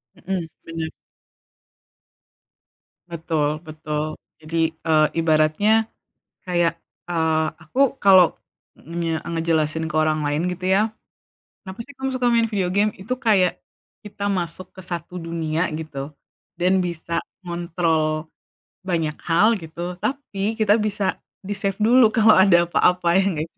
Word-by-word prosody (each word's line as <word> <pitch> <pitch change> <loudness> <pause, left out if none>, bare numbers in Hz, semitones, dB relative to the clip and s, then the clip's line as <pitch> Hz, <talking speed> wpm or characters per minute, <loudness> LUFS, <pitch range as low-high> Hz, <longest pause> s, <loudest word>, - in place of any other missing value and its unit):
Mhm, 180 -2 -4 0.2
bener. 165 -1 -4 2.2
Betul 155 -2 -1
betul. 155 0 -4 0.2
Jadi, 160 +1 0 0.2
eee, 155 -1 +5
ibaratnya 165 +8 +3 0.6
kayak, 175 -2 +1 0.4
eee, 160 -2 +1 0.2
aku 160 - -6 0.2
kalo 190 -2 +8 0.6
ngenye 165 +1 -3
ngejelasin 160 -1 0
ke 155 - -6
orang 155 0 +1
lain 145 +4 0
gitu 180 +1 -6
ya. 210 +3 +3 0.8
Kenapa 190 +2 -9
sih 285 - -14
kamu 265 0 -2
suka 255 -1 0
main 230 -1 +3
video 190 -4 0
game? 205 +3 +2
Itu 235 +7 -4
kayak 190 -7 +2 0.5
kita 205 0 -3
masuk 185 -1 -4
ke - - -8
1 175 0 -6
dunia 165 -1 -2
gitu 150 -2 -6 0.4
dan 180 +2 +2
bisa 170 0 -3 0.2
ngontrol 165 -3 -1 0.6
banyak 165 -4 -1
hal 175 +6 +4
gitu, 160 +1 -11 0.2
tapi 275 -7 -3 0.2
kita 210 -1 +4
bisa 210 -1 -2 0.4
di-save 195 -1 -2
dulu 245 +4 +6
kalo 220 -1 +6
ada 190 -3 +6
apa-apa, 180 0 +2
ya - - +3
gak 155 +2 -2
sih? - - -54
170 Hz, 125 wpm, -22 LUFS, 160-195 Hz, 2.2 s, kalo